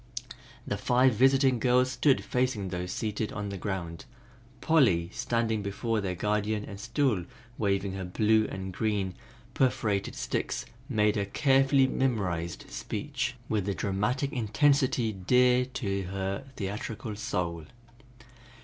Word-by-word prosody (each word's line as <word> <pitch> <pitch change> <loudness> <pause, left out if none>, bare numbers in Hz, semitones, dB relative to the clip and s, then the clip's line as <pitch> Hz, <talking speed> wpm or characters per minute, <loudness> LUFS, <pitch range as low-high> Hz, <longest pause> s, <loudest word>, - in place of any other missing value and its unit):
The - - -2
five 125 +1 +3
visiting 130 +1 +4
girls 125 +1 +3
stood 135 0 +2
facing 125 -6 -1
those 90 0 -4
seated 110 0 -2
on 105 0 -4
the 100 - -5
ground; 85 -1 -4 0.5
Polly 100 - +3
standing 115 -2 0
before 105 +3 -1
their 95 -2 -2
guardian 105 +2 -1
and 100 -1 -9
still 115 -3 0 0.4
waving 100 -2 0
her 95 0 -4
blue 110 +4 +2
and 95 0 -5
green 100 -2 -1 0.4
perforated 105 -7 0
sticks - - -2 0.2
made 105 -4 +2
her 100 - 0
carefully 135 +4 +4
memorized 95 -11 -1
speech 125 - -3
with 105 -3 -1
the 100 - 0
dramatic 105 +8 -1
intensity 125 0 +2
dear 125 +6 +3
to 100 -6 -3
her 95 +5 -3
theatrical 105 +2 -4
soul. 85 -6 -3
105 Hz, 125 wpm, -29 LUFS, 95-125 Hz, 0.5 s, visiting